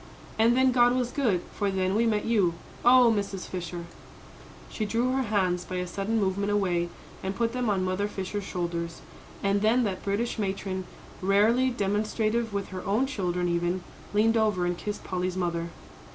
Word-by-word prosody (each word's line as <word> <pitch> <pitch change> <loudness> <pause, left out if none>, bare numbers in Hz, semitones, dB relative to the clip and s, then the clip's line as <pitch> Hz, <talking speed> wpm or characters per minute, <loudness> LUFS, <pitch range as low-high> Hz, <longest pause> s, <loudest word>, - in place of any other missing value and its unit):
And 230 +2 +5
then 260 0 +5
God 245 0 +4
was 250 -1 0
good 220 -12 +1
for 205 - 0
then 190 -1 0
we 230 +3 +3
met 210 -2 +1
you! 200 -7 +2 0.3
Oh, 245 -1 +7
Mrs. 200 -2 -3
Fisher!" 175 -1 -5 0.8
She 220 - -4
drew 230 +4 +1
her 265 +1 +1
hands 190 -6 +1
by 185 - -6
a 180 0 -1
sudden 200 +5 -1
movement 200 +1 0
away, 180 -4 +1 0.3
and 190 +1 -3
put 230 +1 0
them 250 -2 0
on 190 -2 +1
Mother 185 +2 0
Fisher's 200 0 -4
shoulders. 170 -2 -4 0.4
And 200 0 +2
then 230 +4 +3
that 195 -4 -2
British 220 +4 -1
matron, 190 -2 -2 0.4
rarely 215 +7 +4
demonstrative 215 +1 0
with 200 -1 -3
her 185 -1 -6
own 215 +7 +2
children, 180 -9 -1
even, 175 +1 0 0.3
leaned 225 +2 +3
over 210 -5 +2
and 175 0 0
kissed 205 +4 -5
Polly's 185 0 -2
mother. 170 -2 -1
200 Hz, 175 wpm, -27 LUFS, 185-225 Hz, 0.8 s, Oh